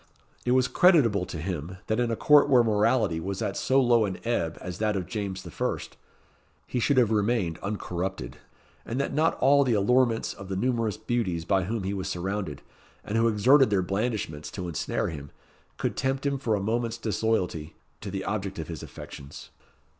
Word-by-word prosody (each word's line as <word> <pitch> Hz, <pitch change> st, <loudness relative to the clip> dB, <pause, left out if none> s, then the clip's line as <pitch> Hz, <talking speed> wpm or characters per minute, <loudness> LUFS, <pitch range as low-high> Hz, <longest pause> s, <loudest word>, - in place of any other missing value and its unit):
It 125 Hz, -, +3 dB
was 130 Hz, -1 st, +3 dB
creditable 120 Hz, -, +4 dB
to -, -, -6 dB
him, 85 Hz, +1 st, -4 dB
that 110 Hz, +2 st, 0 dB
in 120 Hz, -1 st, +1 dB
a 115 Hz, -, 0 dB
court 145 Hz, +5 st, +5 dB
where 125 Hz, -3 st, +6 dB
morality 105 Hz, -4 st, +2 dB
was 95 Hz, +3 st, -4 dB
at 95 Hz, -, -2 dB
so 135 Hz, +1 st, +2 dB
low 120 Hz, -4 st, +4 dB
an 95 Hz, -2 st, -4 dB
ebb 85 Hz, -9 st, -1 dB
as 90 Hz, -1 st, -7 dB
that 105 Hz, -1 st, +1 dB
of 95 Hz, -2 st, -2 dB
James 100 Hz, -3 st, -4 dB
I., 85 Hz, -, -1 dB, 0.9 s
he 125 Hz, -, -2 dB
should 140 Hz, +3 st, +2 dB
have 120 Hz, -4 st, +4 dB
remained 105 Hz, -6 st, +1 dB
uncorrupted; 95 Hz, -, -4 dB, 0.5 s
and 120 Hz, +3 st, -4 dB
that 140 Hz, -, -1 dB
not 155 Hz, +3 st, +2 dB
all 140 Hz, +2 st, +5 dB
the 125 Hz, -4 st, +1 dB
allurements 115 Hz, +3 st, +2 dB
of 100 Hz, -1 st, -10 dB
the 95 Hz, -, -2 dB
numerous 115 Hz, -1 st, 0 dB
beauties 95 Hz, -9 st, -2 dB
by 95 Hz, -1 st, +2 dB
whom 110 Hz, +1 st, -3 dB
he 95 Hz, +1 st, -2 dB
was 95 Hz, -1 st, -3 dB
surrounded, 95 Hz, -4 st, -3 dB, 0.4 s
and 105 Hz, -, -4 dB
who 115 Hz, +1 st, +4 dB
exerted 125 Hz, +5 st, +5 dB
their 100 Hz, -3 st, +2 dB
blandishments 95 Hz, -7 st, -2 dB
to 90 Hz, +1 st, -5 dB
ensnare 85 Hz, -4 st, -2 dB
him, 70 Hz, -3 st, -7 dB, 0.5 s
could -, -, -2 dB
tempt 135 Hz, +1 st, -1 dB
him 140 Hz, -1 st, 0 dB
for 115 Hz, -5 st, 0 dB
a -, -, -1 dB
moment's 115 Hz, +2 st, -1 dB
disloyalty 100 Hz, -9 st, -1 dB, 0.2 s
to 100 Hz, -, -6 dB
the 95 Hz, 0 st, -4 dB
object 100 Hz, -2 st, -3 dB
of 80 Hz, -1 st, -5 dB
his 80 Hz, -, -6 dB
affections. 70 Hz, +1 st, -10 dB
105 Hz, 190 wpm, -27 LUFS, 95-120 Hz, 0.9 s, where